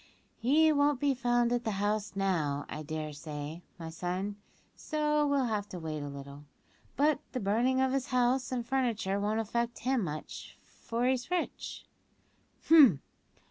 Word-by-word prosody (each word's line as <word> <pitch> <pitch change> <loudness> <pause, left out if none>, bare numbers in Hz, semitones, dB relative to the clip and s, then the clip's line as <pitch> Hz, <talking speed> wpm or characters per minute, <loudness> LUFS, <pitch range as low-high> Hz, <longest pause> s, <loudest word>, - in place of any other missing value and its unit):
"He 305 +7 +4
won't 285 -2 +2
be 285 0 +2
found 240 -1 +1
at 240 -1 0
the 220 -4 -1
house, 205 +1 -1
now, 160 -8 0
I 150 - -6
dare 155 0 -4
say, 150 +2 -6 0.2
my 165 -1 -7
son, 185 +4 -3 0.4
so 300 -1 0
we'll 280 -2 +2
have 210 -3 -2
to 180 - -6
wait 155 -2 -4
a 145 - -5
little; 140 +1 -9 0.5
but 295 +1 +3
the 255 - -1
burning 235 +5 +2
of 265 0 +2
his 270 -2 -1
house 250 0 +1
and 245 -2 -2
furniture 235 -6 0
won't 210 +2 0
affect 235 +2 -1
him 255 -3 0
much, 155 -3 -6
for 235 +1 -4
he's 255 +1 0
rich." 360 -1 -3
230 Hz, 155 wpm, -31 LUFS, 175-260 Hz, 0.5 s, He